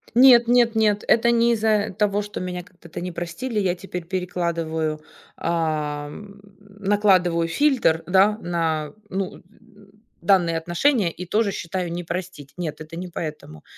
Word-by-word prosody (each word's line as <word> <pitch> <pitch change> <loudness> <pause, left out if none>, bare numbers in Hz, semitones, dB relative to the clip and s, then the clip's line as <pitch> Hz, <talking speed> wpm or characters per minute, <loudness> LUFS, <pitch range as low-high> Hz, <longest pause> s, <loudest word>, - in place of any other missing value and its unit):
Нет 245 -2 +7
нет 240 -1 +4
нет, 210 -2 +2
это 235 +1 +4
не 235 0 +3
из-за 215 -1 +1
того, 210 -1 +1
что 205 0 -6
меня 180 -1 -4
когда-то 175 -3 -11
не 180 - -4
простили. 175 +8 -4
Я 185 -3 +1
теперь 180 -1 -7
перекладываю. 165 -4 -2 0.4
Ам, 155 +4 -3 0.2
накладываю 195 -4 +1
фильтр, 230 - +2
да. 195 +3 +4
На 160 -3 -1 0.2
ну, 190 -1 -3
н - - -17 0.8
данные 170 -3 +3
отношения, 175 - +1
и 180 - -8
тоже 210 +3 +1
считаю: 175 -1 -4
"Не 175 - -4
простить". 170 -5 -6
Нет, 160 -3 -5
это 160 +2 -9
не 180 +1 -5
поэтому. 150 - -7
180 Hz, 145 wpm, -23 LUFS, 165-210 Hz, 0.8 s, Нет